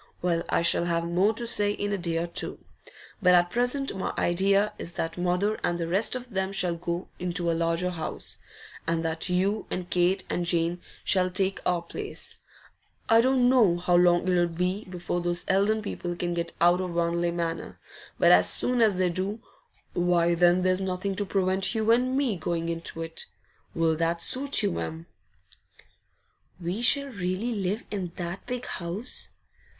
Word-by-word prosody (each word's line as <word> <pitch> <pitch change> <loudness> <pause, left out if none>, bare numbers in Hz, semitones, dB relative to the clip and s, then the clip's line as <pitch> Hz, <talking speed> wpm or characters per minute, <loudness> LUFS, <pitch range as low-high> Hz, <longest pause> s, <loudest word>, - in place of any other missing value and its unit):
Well, 170 -2 +1
I - - +2
shall 170 0 +3
have 170 -1 0
more 180 +5 +2
to 235 - -3
say 205 -3 +3
in 205 0 -2
a - - 0
day 170 -2 -2
or 165 - 0
two. 170 - -3 0.6
But 180 -2 +6
at 175 0 +3
present 245 +4 0
my 190 - -2
idea 195 +4 +2
is 170 - -6
that 165 - -3
mother 180 +4 0
and 175 0 0
the 165 - -2
rest 195 +8 +2
of 250 -1 -7
them 190 -1 -1
shall 180 -3 +1
go 170 +1 -4
into 175 -1 -1
a - - +1
larger 165 +2 0
house, 160 -3 -6 0.5
and 165 0 0
that 160 +2 -1
you 195 +4 0
and 180 -1 -4
Kate 180 +2 +2
and 175 - -1
Jane 170 0 +1 0.2
shall 185 -1 +2
take 190 +1 0
our 175 -1 +1
place. 410 - -6 0.7
I 225 0 +7
don't 255 0 +3
know 230 -9 +4
how 175 0 +1
long 175 0 +4
it'll 175 -1 +3
be 180 +4 -2
before 175 -1 -3
those 175 0 -2
Eldon 205 +3 +2
people 175 -3 -4
can 175 0 -2
get 170 0 -3
out 175 +2 +4
of 180 -2 -4
Wanley 170 0 +1
Manor, 170 -1 -3 0.4
but - - +5
as - - +6
soon 250 -1 +1
as 210 -5 +4
they 185 -1 +2
do, 190 +5 -2 0.5
why 175 -1 +2
then 175 +1 +4
there's 185 +1 +2
nothing 190 +1 -2
to 205 - 0
prevent 190 +2 +1
you 220 0 +2
and 255 +3 +2
me 255 -8 0
going 165 0 -2
into 165 0 -4
it. 165 0 -5 0.5
Will 165 -1 +2
that 165 +1 0
suit 275 +9 +2
you, 85 - 0
Em?' 80 0 -5 1.5
'We 180 +5 -3
shall 280 +3 +4
really 200 +1 -2
live 200 +1 -2
in 185 -5 -4
that 175 +1 -5
big 250 0 -4
house? 185 +7 -5
180 Hz, 180 wpm, -27 LUFS, 170-205 Hz, 1.5 s, I